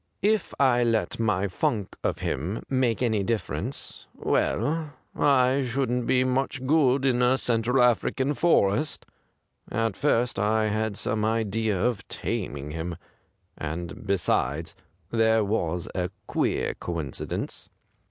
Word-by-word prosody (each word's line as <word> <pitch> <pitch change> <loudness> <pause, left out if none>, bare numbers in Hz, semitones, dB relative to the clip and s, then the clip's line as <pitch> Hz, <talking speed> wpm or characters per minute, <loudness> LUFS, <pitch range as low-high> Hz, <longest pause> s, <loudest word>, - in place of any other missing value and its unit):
If 210 -1 +2
I 125 -3 +4
let 115 -1 0
my 105 -3 +1
funk 100 +2 -1
of - - 0
him 90 +11 -2
make 130 -3 +1
any 110 -4 +2
differ 110 -1 -1
ence - - -5
— - - -32
well, 155 -1 0 0.2
I 135 -1 +4
shouldn't 125 -1 -1
be 130 0 +4
much 130 +1 -1
good 135 -2 +3
in 125 -2 +2
a 125 +2 +4
Central 120 +1 +2
African 130 +3 +2
forest. 150 - +2 0.7
At 115 -3 0
first 120 -4 +1
I 110 +1 +2
had 110 -1 -1
some 105 0 -1
idea 110 -2 0
of 120 0 -1
taming 70 +1 -4
him 80 +2 -4 0.3
— - - -43 0.3
and;, 80 +2 -5
besides, 80 -5 0 0.4
there 110 -1 +3
was 90 -4 -1
a 90 -1 -1 0.2
queer - - 0
coincidence.' 80 -6 -5
115 Hz, 135 wpm, -26 LUFS, 100-130 Hz, 0.7 s, I